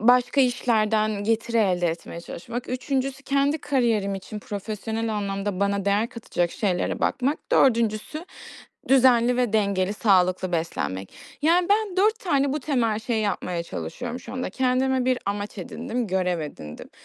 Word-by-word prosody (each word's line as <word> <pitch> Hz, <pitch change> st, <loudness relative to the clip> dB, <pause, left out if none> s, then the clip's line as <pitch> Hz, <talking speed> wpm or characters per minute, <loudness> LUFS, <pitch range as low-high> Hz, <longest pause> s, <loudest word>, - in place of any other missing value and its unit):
başka 245 Hz, +4 st, +4 dB
işlerden 215 Hz, -4 st, +1 dB
getiri 230 Hz, +1 st, 0 dB
elde 180 Hz, -5 st, +2 dB
etmeye 170 Hz, 0 st, -4 dB
çalışmak, 235 Hz, +8 st, -7 dB
3'üncüsü 265 Hz, +1 st, -2 dB
kendi 280 Hz, +2 st, +1 dB
kariyerim 230 Hz, -9 st, +1 dB
için 195 Hz, +2 st, -7 dB
profesyonel 220 Hz, +2 st, -4 dB
anlamda 200 Hz, -1 st, -2 dB
bana 200 Hz, -1 st, +1 dB
değer 205 Hz, +3 st, +2 dB
katacak 175 Hz, -7 st, -2 dB
şeylere 185 Hz, -3 st, -1 dB
bakmak, 275 Hz, +4 st, 0 dB
4'üncüsü 235 Hz, +5 st, +2 dB, 0.6 s
düzenli 250 Hz, -2 st, +5 dB
ve 245 Hz, -4 st, +1 dB
dengeli, 200 Hz, -3 st, +1 dB
sağlıklı 185 Hz, -3 st, +2 dB
beslenmek. 100 Hz, -, -2 dB, 0.3 s
Yani, 345 Hz, +4 st, +3 dB
ben, 410 Hz, -2 st, +1 dB
4 430 Hz, +3 st, +3 dB
tane 280 Hz, -6 st, +1 dB
bu 300 Hz, -, -2 dB
temel 240 Hz, -7 st, 0 dB
şeyi 220 Hz, 0 st, -1 dB
yapmaya 180 Hz, -4 st, -2 dB
çalışıyorum 235 Hz, -, -6 dB
şu 235 Hz, -, -10 dB
anda. 255 Hz, 0 st, -3 dB
Kendime 260 Hz, 0 st, +1 dB
bir 255 Hz, 0 st, +2 dB
amaç 205 Hz, +1 st, -3 dB
edindim, 230 Hz, +5 st, -4 dB
görev 180 Hz, -2 st, 0 dB
edindim. 75 Hz, -, -8 dB
225 Hz, 140 wpm, -25 LUFS, 200-255 Hz, 0.6 s, düzenli